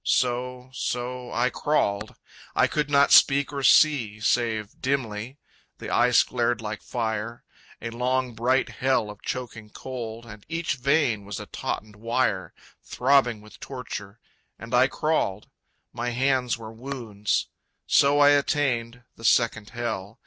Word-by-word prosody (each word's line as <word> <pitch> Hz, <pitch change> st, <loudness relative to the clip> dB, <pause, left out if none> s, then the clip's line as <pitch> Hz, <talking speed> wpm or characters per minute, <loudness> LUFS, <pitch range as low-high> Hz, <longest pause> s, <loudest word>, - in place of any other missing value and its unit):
So, 125 Hz, 0 st, -1 dB
so, 125 Hz, 0 st, -4 dB
I 125 Hz, +2 st, +1 dB
crawled. 105 Hz, -8 st, 0 dB, 0.4 s
I -, -, +5 dB
could 150 Hz, -1 st, -1 dB
not 140 Hz, -1 st, +4 dB
speak 140 Hz, +1 st, +5 dB
or 140 Hz, -, -3 dB
see 130 Hz, -7 st, +4 dB
Save 110 Hz, -1 st, -1 dB
dimly. 130 Hz, -2 st, -2 dB, 0.4 s
The -, -, -7 dB
ice -, -, +5 dB
glared 120 Hz, -2 st, 0 dB
like 110 Hz, -1 st, -5 dB
fire, 115 Hz, -1 st, -3 dB, 0.4 s
A 115 Hz, -, -4 dB
long 125 Hz, +1 st, -1 dB
bright 125 Hz, +4 st, +1 dB
Hell 120 Hz, -2 st, 0 dB
of 105 Hz, -, -14 dB
choking 115 Hz, -4 st, -5 dB
cold, 120 Hz, -2 st, -7 dB
And 110 Hz, -2 st, -12 dB
each 165 Hz, -3 st, -2 dB
vein 135 Hz, -5 st, +1 dB
was 100 Hz, 0 st, -6 dB
a -, -, -7 dB
tautened 105 Hz, -1 st, -5 dB
wire, 115 Hz, -4 st, -1 dB, 0.3 s
Throbbing 125 Hz, -4 st, +2 dB
with 105 Hz, 0 st, -15 dB
torture 115 Hz, -5 st, -7 dB, 0.4 s
and -, -, -10 dB
I -, -, +5 dB
crawled. -, -, -1 dB, 0.4 s
My 120 Hz, +1 st, -2 dB
hands 125 Hz, 0 st, +1 dB
were 110 Hz, -1 st, -9 dB
wounds. 115 Hz, -4 st, -3 dB, 0.4 s
So 140 Hz, +1 st, +4 dB
I 145 Hz, -, +8 dB
attained 125 Hz, -4 st, 0 dB
The 115 Hz, -, -14 dB
second 110 Hz, -3 st, +2 dB
Hell. 115 Hz, -3 st, -5 dB
120 Hz, 140 wpm, -25 LUFS, 110-130 Hz, 0.4 s, I